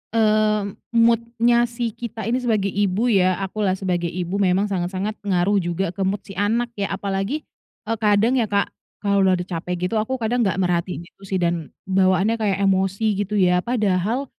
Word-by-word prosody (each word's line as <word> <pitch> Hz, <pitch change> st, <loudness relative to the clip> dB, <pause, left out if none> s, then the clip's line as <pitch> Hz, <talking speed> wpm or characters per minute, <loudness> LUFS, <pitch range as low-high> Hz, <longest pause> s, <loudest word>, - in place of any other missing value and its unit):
eee, 215 Hz, -1 st, +3 dB, 0.3 s
mood-nya 235 Hz, +1 st, +3 dB
si 235 Hz, -1 st, -3 dB
kita 230 Hz, -1 st, -6 dB
ini 245 Hz, +3 st, 0 dB
sebagai 215 Hz, -5 st, 0 dB
ibu 205 Hz, +2 st, +1 dB
ya, 185 Hz, -3 st, +3 dB
aku 195 Hz, +3 st, -4 dB
lah 190 Hz, -2 st, +1 dB
sebagai 180 Hz, -3 st, -1 dB
ibu 180 Hz, +3 st, -3 dB
memang 190 Hz, +1 st, +2 dB
sangat-sangat 190 Hz, +2 st, -2 dB
ngaruh 200 Hz, 0 st, +2 dB
juga 175 Hz, +1 st, -2 dB
ke 195 Hz, -, -6 dB
mood 190 Hz, +1 st, 0 dB
si 195 Hz, -, -9 dB
anak 225 Hz, +5 st, 0 dB
ya. 200 Hz, -3 st, -3 dB
Apalagi, 200 Hz, +9 st, -2 dB, 0.4 s
eee, 225 Hz, +1 st, -1 dB
kadang 210 Hz, +3 st, +3 dB
ya, 225 Hz, -3 st, 0 dB
Kak, 200 Hz, -1 st, +1 dB, 0.3 s
kalau 200 Hz, -1 st, +1 dB
udah 190 Hz, -1 st, +4 dB
udah 180 Hz, -, -4 dB
capek 180 Hz, 0 st, -3 dB
gitu, 185 Hz, -, -2 dB
aku 260 Hz, +5 st, -2 dB
kadang 240 Hz, +1 st, 0 dB
nggak 195 Hz, -5 st, +1 dB
merhatiin 175 Hz, -2 st, -1 dB
gitu 185 Hz, -, -24 dB
sih 195 Hz, -1 st, -2 dB
dan 170 Hz, -3 st, -1 dB, 0.2 s
bawaannya 190 Hz, +2 st, +2 dB
kayak 200 Hz, -3 st, +1 dB
emosi 195 Hz, +3 st, +1 dB
gitu 205 Hz, +1 st, -2 dB
ya. 180 Hz, -2 st, +3 dB
Padahal 215 Hz, +2 st, 0 dB
200 Hz, 185 wpm, -22 LUFS, 185-220 Hz, 0.4 s, udah